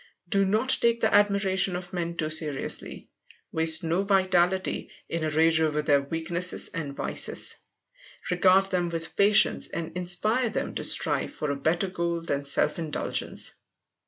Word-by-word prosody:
Do 195 +2 +1
not 220 +7 +1
take 235 0 +2
the 220 - 0
admiration 195 -2 +2
of 180 +1 -8
men 170 -1 -4
too 155 0 -2
seriously. 155 -3 -2 0.4
Waste 160 0 +3
no 165 +3 0
vitality 190 -2 +1 0.2
in 165 -1 -4
a 155 - 0
rage 160 +1 +2
over 150 -1 0
their 145 -2 +3
weaknesses 165 +5 0
and 150 -5 -6
vices. - - 0 0.7
Regard 185 +2 +4
them 175 -2 0
with 165 -1 -4
patience 205 +1 +4
and 165 0 -6
inspire 215 +8 0
them - - -4
to - - -4
strive - - +3
for 150 -2 -3
a - - -2
better 160 +7 0
goal 170 -2 -3
than 140 -4 -3
self 140 - 0
indulgence. 155 -3 -3
175 Hz, 155 wpm, -26 LUFS, 160-190 Hz, 0.7 s, Regard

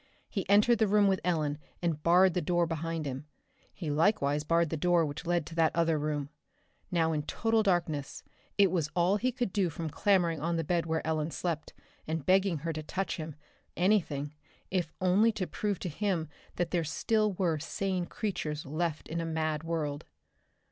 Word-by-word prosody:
He 195 -3 -4
entered 210 +3 +5
the 220 - +4
room 205 +1 +4
with 190 -1 +1
Ellen 155 -4 0 0.2
and 165 -4 -1
barred 180 +2 +5
the 180 - 0
door 175 +1 +2
behind 165 -1 -3
him. 135 +2 -5 0.4
He 160 -5 -4
likewise 150 -3 +2
barred 165 0 +2
the - - 0
door 170 +1 +3
which 145 +3 -6
led 175 -2 +1
to 165 - -9
that 165 -1 +2
other 165 -2 +2
room. 145 -1 -2 0.6
Now 165 -2 +2
in 155 -2 0
total 225 +8 +1
darkness 170 -8 -1 0.3
it 200 -3 +5
was 165 -5 0
all 180 +3 +3
he 255 +4 0
could 245 -6 -2
do 190 -4 +2
from 160 0 -5
clambering 175 -5 +2
on 170 +2 0
the 165 - 0
bed 170 +1 0
where 160 0 -1
Ellen 155 -1 0
slept, 165 -2 -3 0.3
and 160 -2 -2
begging 190 -1 +3
her 165 - -1
to 155 - -4
touch 190 +5 -3
him 155 -2 -6 0.4
anything 160 -6 +1 0.4
if 175 -4 0
only 190 +5 +4
to 195 -3 -2
prove 205 +1 -2
to 180 - -2
him 175 -1 -1 0.3
that 175 -1 -1
there 175 -2 +1
still 215 +6 +1
were 175 -4 0
sane 180 +3 -2
creatures 165 -9 -3
left 155 +2 -2
in 165 +1 -3
a - - -2
mad 155 -1 -1
world. 155 -3 -3
170 Hz, 190 wpm, -30 LUFS, 155-190 Hz, 0.6 s, entered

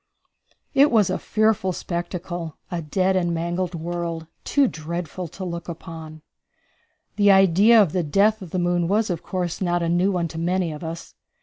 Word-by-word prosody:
It 280 +2 +6
was 210 -7 +3
a - - -1
fearful 215 -3 +1
spectacle; 175 -2 -5
a 175 -1 -2
dead 185 +5 +1
and 175 -2 +1
mangled 175 +2 -2
world, 170 0 -4 0.2
too 285 -2 +3
dreadful 170 +1 -5
to 185 +4 -8
look 170 0 -5
upon. 160 -2 -9 0.9
The 205 -1 +5
idea 195 +4 +6
of 195 -7 +4
the 180 - 0
death 200 +8 +2
of 185 - -8
the 185 - -3
moon 175 -1 +1
was, 210 +2 +1
of 170 - -3
course, 180 -2 -3
not 175 -1 +1
a 165 - 0
new 180 +3 +2
one 175 -3 0
to 165 - -6
many 175 0 0
of 150 +2 -8
us. 165 +1 -7
175 Hz, 180 wpm, -23 LUFS, 170-190 Hz, 0.9 s, It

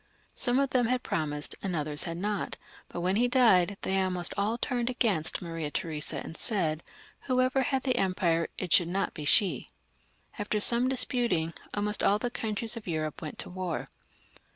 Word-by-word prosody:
Some 245 +1 0
of 275 -1 +1
them 245 -3 +2
had 250 +1 0
promised 150 -2 0
and 190 -3 -2
others 150 -1 +1
had 165 -1 -4
not, 205 +2 -2 0.3
but 175 - -5
when 185 +3 +1
he 245 +2 +3
died 200 -7 +4
they 190 0 +1
almost 180 -2 -1
all 210 +4 0
turned 245 0 -1
against 210 - 0
Maria 165 -3 -4
Theresa 155 0 -1
and 160 - -8
said, 165 -8 -1 0.5
whoever 255 +1 +2
had 265 0 0
the 255 -2 +1
empire, 185 -5 +1
it 180 -3 0
should 175 - +5
not 195 +3 -1
be 150 - -6
she. 190 +6 +2 0.7
After 210 +1 -1
some 240 +4 +5
disputing, 240 -10 +1 0.2
almost 210 0 0
all 205 - +4
the 240 +3 -3
countries 225 0 -2
of 225 -4 -9
Europe 155 -2 -3
went 155 - -6
to - - -4
war. 180 -3 -3
195 Hz, 175 wpm, -29 LUFS, 165-240 Hz, 0.7 s, should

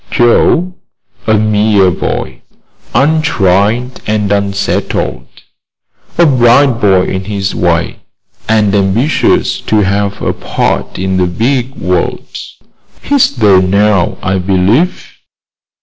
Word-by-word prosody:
"Joe? 160 +9 +2 0.5
A 110 - +3
mere 105 -2 +2
boy, 65 -6 -4 0.5
untried 125 - +1
and 105 -1 -1
unsettled. 100 0 -2 0.9
A 170 - +5
bright 125 -2 +3
boy, 95 -3 +3
in 95 0 -4
his 100 -1 -3
way, 85 -1 -1 0.5
and 105 -2 +2
ambitious 105 +9 +1
to 110 -1 0
have 100 +1 -1
a - - -2
part - - -3
in 95 0 -2
the 90 -1 +1
big 125 +7 -2
world. 90 +1 -2 0.8
He's 280 - +1
there 100 -6 +4
now, 100 0 +1
I 95 +1 0
believe." 100 - 0
105 Hz, 105 wpm, -11 LUFS, 95-120 Hz, 0.9 s, A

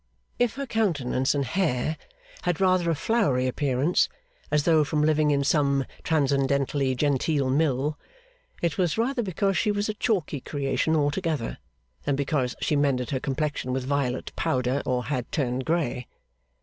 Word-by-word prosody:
If 245 -3 +2
her 275 +1 -3
countenance 150 - 0
and 140 -1 0
hair 155 -2 0 0.5
had 175 -3 -1
rather 185 -2 +3
a 165 - +2
floury 145 - +1
appearance, 135 +4 +1 0.4
as 150 -1 +2
though 160 -2 +4
from 150 +1 0
living 155 -1 +3
in 140 -1 +2
some 140 -2 +2 0.2
transcendently 140 -2 +1
genteel 140 0 +1
Mill, 145 0 +1 0.6
it 170 -1 0
was 175 -1 +1
rather 240 +2 +1
because 195 -1 0
she 215 - +1
was 205 +1 -1
a - - 0
chalky 190 - -1
creation 140 +3 -1
altogether, 150 -3 -1 0.5
than 145 - +1
because 140 -3 -1
she 150 - +1
mended 135 -4 +1
her 130 - 0
complexion 140 -2 -2
with 130 -1 -2
violet 135 -2 -1
powder, 130 +2 0
or 125 -1 0
had 130 -4 -3
turned 130 -4 -1
grey. 160 -7 -1
145 Hz, 150 wpm, -26 LUFS, 130-165 Hz, 0.6 s, though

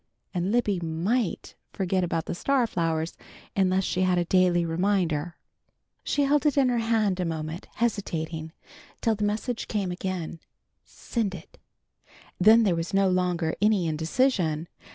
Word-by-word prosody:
And 180 +1 -1
Libby 215 -5 +1
might 175 +7 -1 0.2
forget 190 -1 0
about 165 -2 -1
the - - -3
star 260 +7 +1
flowers 165 -5 -1 0.4
unless 190 -1 +2
she 185 - -1
had 185 -1 +3
a 175 - +1
daily 180 -1 +3
reminder. 170 -2 0 0.7
She 285 - +1
held 290 +1 +3
it 290 - +1
in 265 -2 +4
her 240 -1 +1
hand 220 -4 +1
a - - +1
moment, 160 0 -4
hesitating, 165 -8 -2 0.5
till 225 - +2
the 210 -1 -3
message 215 +3 -2
came 200 -4 -1
again, 180 -2 -4 0.4
"Send 215 -5 -3
it!" 165 - -13 0.8
Then 220 +5 +7
there 190 -5 +2
was 165 +3 -3
no 195 -1 +4
longer 180 -3 0
any 210 -4 +3
indecision. 165 - 0
185 Hz, 150 wpm, -26 LUFS, 165-215 Hz, 0.8 s, Then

